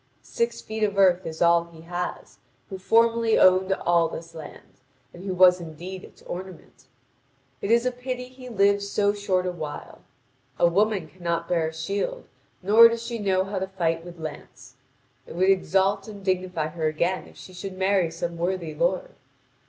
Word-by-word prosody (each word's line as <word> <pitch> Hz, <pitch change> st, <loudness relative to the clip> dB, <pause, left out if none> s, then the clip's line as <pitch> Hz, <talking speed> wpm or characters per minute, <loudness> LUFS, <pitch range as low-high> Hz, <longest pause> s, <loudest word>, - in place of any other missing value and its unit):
Six 235 Hz, 0 st, -2 dB
feet 220 Hz, 0 st, -6 dB
of 205 Hz, -2 st, 0 dB
earth 185 Hz, -2 st, +4 dB
is 160 Hz, +1 st, -2 dB
all 170 Hz, 0 st, +4 dB
he 165 Hz, -1 st, -15 dB
has, 175 Hz, +2 st, -6 dB, 0.3 s
who 190 Hz, -, -6 dB
formerly 230 Hz, +3 st, +3 dB
owned 185 Hz, +1 st, +5 dB
all 170 Hz, -3 st, +2 dB
this 165 Hz, +1 st, -8 dB
land, 160 Hz, -2 st, -12 dB, 0.3 s
and 175 Hz, -, -11 dB
who 190 Hz, -, -2 dB
was 180 Hz, 0 st, +6 dB
indeed 175 Hz, +3 st, -8 dB
its -, -, -16 dB
ornament. 180 Hz, -6 st, -9 dB, 0.8 s
It 200 Hz, -, -3 dB
is 235 Hz, +2 st, +4 dB
a 250 Hz, -, +1 dB
pity 250 Hz, 0 st, -5 dB
he 255 Hz, 0 st, -12 dB
lived 200 Hz, -2 st, +3 dB
so 200 Hz, 0 st, +1 dB
short 190 Hz, -3 st, -1 dB
a 180 Hz, -, -1 dB
while. 155 Hz, -4 st, -8 dB, 0.6 s
A -, -, +4 dB
woman 195 Hz, 0 st, +1 dB
cannot 170 Hz, -1 st, -3 dB
bear 165 Hz, -3 st, +1 dB
a 160 Hz, -, -6 dB
shield, 200 Hz, -, -3 dB, 0.4 s
nor 220 Hz, +4 st, +8 dB
does 230 Hz, 0 st, -4 dB
she 235 Hz, -1 st, -4 dB
know 190 Hz, -2 st, +1 dB
how 195 Hz, 0 st, -4 dB
to 190 Hz, -, -3 dB
fight 165 Hz, -4 st, -1 dB
with 175 Hz, 0 st, -11 dB
lance. 155 Hz, -2 st, -9 dB, 0.5 s
It -, -, -10 dB
would 185 Hz, +2 st, +4 dB
exalt 195 Hz, +1 st, +1 dB
and 200 Hz, -3 st, -10 dB
dignify 180 Hz, -4 st, -1 dB
her 160 Hz, -1 st, -2 dB
again 170 Hz, +4 st, -1 dB
if -, -, -18 dB
she 185 Hz, -, -12 dB
should 185 Hz, +1 st, -7 dB
marry 190 Hz, -2 st, +2 dB
some 170 Hz, +1 st, -5 dB
worthy 175 Hz, -2 st, -2 dB
lord. -, -, -1 dB
185 Hz, 180 wpm, -25 LUFS, 170-205 Hz, 0.8 s, nor